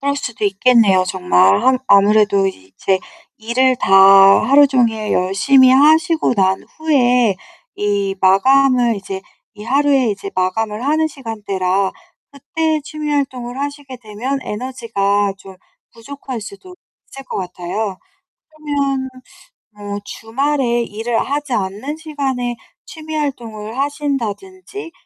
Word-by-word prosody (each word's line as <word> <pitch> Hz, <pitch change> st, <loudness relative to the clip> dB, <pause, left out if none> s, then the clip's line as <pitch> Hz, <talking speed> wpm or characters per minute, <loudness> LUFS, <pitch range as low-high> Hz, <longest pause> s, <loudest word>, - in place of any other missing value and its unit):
그럴 280 Hz, 0 st, -1 dB
수도 240 Hz, -6 st, -5 dB
있겠네요 200 Hz, -2 st, +3 dB
정말. 140 Hz, -, +2 dB
항 260 Hz, 0 st, +3 dB
아무래도 200 Hz, -1 st, +4 dB
이제 190 Hz, -, -3 dB, 0.4 s
일을 250 Hz, +3 st, +1 dB
다 195 Hz, -, -2 dB, 0.6 s
하루종일 250 Hz, -6 st, +3 dB
열심히 255 Hz, +9 st, +3 dB
하시고 310 Hz, +1 st, +3 dB
난 190 Hz, -1 st, +1 dB
후에 250 Hz, -, +2 dB, 0.4 s
이 200 Hz, -1 st, -1 dB
마감을 245 Hz, +4 st, +3 dB
이제 195 Hz, -1 st, -6 dB, 0.3 s
이 210 Hz, -, -11 dB
하루에 275 Hz, -1 st, +2 dB
이제 195 Hz, -1 st, -6 dB
마감을 210 Hz, +5 st, -2 dB
하는 310 Hz, +2 st, +1 dB
시간대라 200 Hz, -8 st, -2 dB, 0.4 s
그때 315 Hz, +2 st, -2 dB
취미 305 Hz, 0 st, -6 dB
활동을 260 Hz, -3 st, -3 dB
하시게 285 Hz, -2 st, -6 dB
되면 245 Hz, +5 st, -4 dB
에너지가 210 Hz, -4 st, -2 dB
좀 190 Hz, -1 st, -14 dB, 0.4 s
부족할 255 Hz, 0 st, -8 dB
수도 210 Hz, -, -11 dB, 0.4 s
있을 270 Hz, 0 st, -10 dB
것 -, -, -6 dB
같아요. 185 Hz, +2 st, -4 dB, 0.5 s
그러면 285 Hz, -4 st, -3 dB, 0.6 s
뭐 205 Hz, -1 st, -7 dB
주말에 240 Hz, +2 st, -1 dB
일을 225 Hz, +2 st, -3 dB
하지 290 Hz, -1 st, -3 dB
않는 210 Hz, +9 st, -3 dB
시간에 270 Hz, -6 st, -3 dB, 0.3 s
취미 315 Hz, -1 st, -8 dB
활동을 235 Hz, -6 st, -5 dB
하신다든지 290 Hz, -, -4 dB
240 Hz, 260 characters per minute, -17 LUFS, 200-280 Hz, 0.6 s, 아무래도